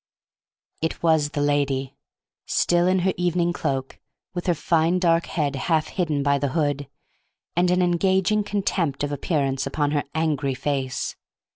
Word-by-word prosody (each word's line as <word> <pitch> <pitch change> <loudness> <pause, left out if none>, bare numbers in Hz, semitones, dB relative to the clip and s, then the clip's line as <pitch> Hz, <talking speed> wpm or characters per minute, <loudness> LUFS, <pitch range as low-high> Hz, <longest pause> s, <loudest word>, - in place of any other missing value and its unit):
It 160 +1 -2
was 160 -3 +3
the 145 - -3
lady, 140 -2 0 0.5
still 175 0 +2
in 185 +1 +3
her 190 - +2
evening 175 -1 +1
cloak, 135 -5 -3 0.3
with 175 0 -4
her 175 - +3
fine 165 +2 +2
dark 170 -2 +2
head 145 -3 -1
half 155 +3 0
hidden 155 -6 -1
by 140 0 +2
the 140 -2 -1
hood, 145 -3 0 0.7
and 175 +1 +3
an 180 0 +3
engaging 190 +4 +2
contempt 190 -8 -1
of 145 - -1
appearances 140 -2 -1
upon 145 +1 0
her 145 -1 0
angry 150 -4 0
face. 135 -2 -2
155 Hz, 150 wpm, -24 LUFS, 140-175 Hz, 0.7 s, was